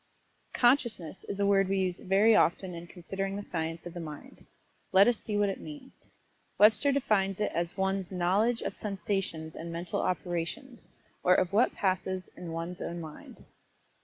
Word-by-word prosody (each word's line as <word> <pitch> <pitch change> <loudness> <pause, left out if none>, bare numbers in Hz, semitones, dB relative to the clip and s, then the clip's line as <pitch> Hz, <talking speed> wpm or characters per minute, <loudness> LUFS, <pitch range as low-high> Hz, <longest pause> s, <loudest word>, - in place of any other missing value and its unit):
"Consciousness" 240 - +2
is 200 - -5
a 200 - +3
word 195 -1 +3
we 195 - +1
use 185 -2 0
very 200 +4 +4
often 185 0 +2
in 170 0 -8
considering 195 +3 -4
the 205 - -4
science 165 -2 -4
of 175 - -7
the 175 - -6
Mind. 155 -3 -9 0.4
Let 195 +3 +7
us 240 -2 +3
see 210 -2 -3
what 205 -1 +3
it 195 - -4
means. 290 -3 -11 0.5
Webster 220 +7 +5
defines 200 -8 +1
it 210 - 0
as 170 +2 -2
one's 190 -1 -1
"knowledge 195 +6 +2
of - - -3
sensations 195 -6 -3
and 170 +1 -7
mental 170 +1 -2
operations, 180 - -3 0.3
or 180 0 +5
of 185 +1 +1
what 230 +5 +3
passes 185 -1 -1
in 175 -2 -7
one's 165 +2 -5
own 170 - -4
mind." 155 -2 -10
190 Hz, 170 wpm, -30 LUFS, 175-205 Hz, 0.5 s, Let